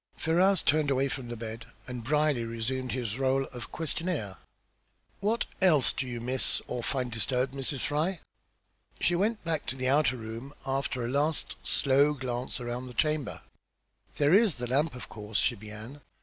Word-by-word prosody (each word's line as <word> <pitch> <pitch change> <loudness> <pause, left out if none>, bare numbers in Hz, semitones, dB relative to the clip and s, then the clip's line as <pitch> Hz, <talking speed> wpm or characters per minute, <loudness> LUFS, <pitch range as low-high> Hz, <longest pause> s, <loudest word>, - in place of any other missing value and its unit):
Ferrars 180 +3 +3
turned 150 -1 +3
away 135 0 +2
from 130 -3 -4
the 120 - -5
bed, 115 0 -6 0.2
and 125 -2 -6
Brierly 150 -1 +2
resumed 115 +3 -2
his 120 -4 -2
rôle 135 0 +2
of 120 -1 -7
questioner. 160 - -2 0.8
"What 220 +4 +1 0.2
else 160 -8 +5
do 130 - -3
you 120 -1 -4
miss 125 +2 +2
or 120 - -3
find 125 0 -1
disturbed, 125 +4 0
Mrs. 135 0 -3
Fry?" 155 +5 0 0.8
She 175 - +2
went 210 +5 +1
back 160 -3 -2
to 125 - -2
the 130 -1 0
outer 140 -2 +3
room 115 +5 -7
after 135 -2 -1
a 120 - -2
last 145 +3 0
slow 140 +2 +3
glance 125 -2 -3
about 120 +1 -4
the 125 - -10
chamber. 150 +4 0 0.7
"There 145 +2 +4
is 205 - +5
the 125 - -4
lamp, 140 +3 +1
of 125 - -7
course," 105 -1 -5
she 130 - +3
began. 110 +6 -9
130 Hz, 170 wpm, -29 LUFS, 120-150 Hz, 0.8 s, else